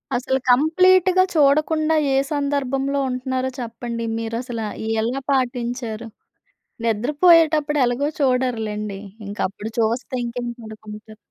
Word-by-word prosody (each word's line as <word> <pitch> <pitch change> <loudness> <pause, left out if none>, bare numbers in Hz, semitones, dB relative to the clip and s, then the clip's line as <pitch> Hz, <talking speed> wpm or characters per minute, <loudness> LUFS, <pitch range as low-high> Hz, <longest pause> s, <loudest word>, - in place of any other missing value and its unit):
అసలు 265 +2 0
కంప్లీట్‌గా 370 +7 +5
చూడకుండా 305 +2 +3 0.2
ఏ - - +3 0.2
సందర్భంలో 280 -1 -1
ఉంటున్నారో 255 +1 -2
చెప్పండి? 235 0 -5
మీరసల 230 +1 -4 0.4
ఎలా 250 +5 -2
పాటించారు? 240 -3 -2 0.8
నిద్రపోయేటప్పుడు 300 - +3
ఎలాగో 260 +5 0
చూడరులెండి! 225 -7 -1 0.3
ఇంకప్పుడు 205 +2 -4
చూస్తే 235 +3 -1
ఇంకేం 240 0 -4
పడుకుంటారు. 215 0 -11
255 Hz, 90 wpm, -21 LUFS, 230-285 Hz, 0.8 s, కంప్లీట్‌గా